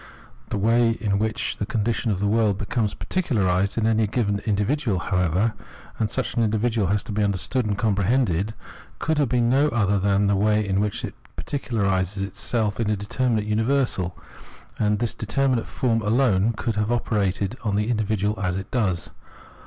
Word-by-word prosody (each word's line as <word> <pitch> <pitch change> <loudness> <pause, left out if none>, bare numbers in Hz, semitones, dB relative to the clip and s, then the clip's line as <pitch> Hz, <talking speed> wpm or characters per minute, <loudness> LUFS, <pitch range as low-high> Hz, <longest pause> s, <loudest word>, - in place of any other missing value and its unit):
The - - -2
way 115 +2 +3
in 100 -3 0
which 110 0 -1
the 105 - -2
condition 115 +2 -1
of 100 -3 0
the 100 - 0
world 105 -2 +2
becomes 105 +1 -1
particularised 100 - 0
in 110 - +1
any 110 -1 +2
given 105 -2 0
individual, 110 +2 +1
however 90 +4 +1 0.2
— - - -20
and 110 -2 +1
such 130 +4 -2
an 120 - +1
individual 110 -1 +1
has 100 +2 +1
to - - -7
be 105 +1 0
understood 105 +5 0
and 100 -1 -1
compre 100 -3 +1
hended 110 -4 +1 0.2
— - - -20
could 160 -1 0
have 140 -4 +2
been 120 -2 +2
no 135 +5 +4
other 100 -6 +1
than 100 +1 +2
the 100 0 +3
way 105 +1 +2
in 95 0 +1
which 105 0 -1
it - - -7 0.2
particularises 100 -8 -1
itself 105 +2 -2
as 115 - 0
a 105 - +2
determinate 110 +2 -1
universal, 110 -4 0 0.6
and 105 - +2
in - - +1
this 120 +1 -1
determinate 125 +2 0
form 115 -3 0
alone 110 -1 +2
could 110 0 -3
it - - +2
have 105 +2 0
operated 100 -3 0
on 105 -3 0
the 105 +1 0
individual 105 -2 0
as 95 -3 -1
it 95 0 -7
does. 100 -9 -1
105 Hz, 190 wpm, -24 LUFS, 100-115 Hz, 0.6 s, no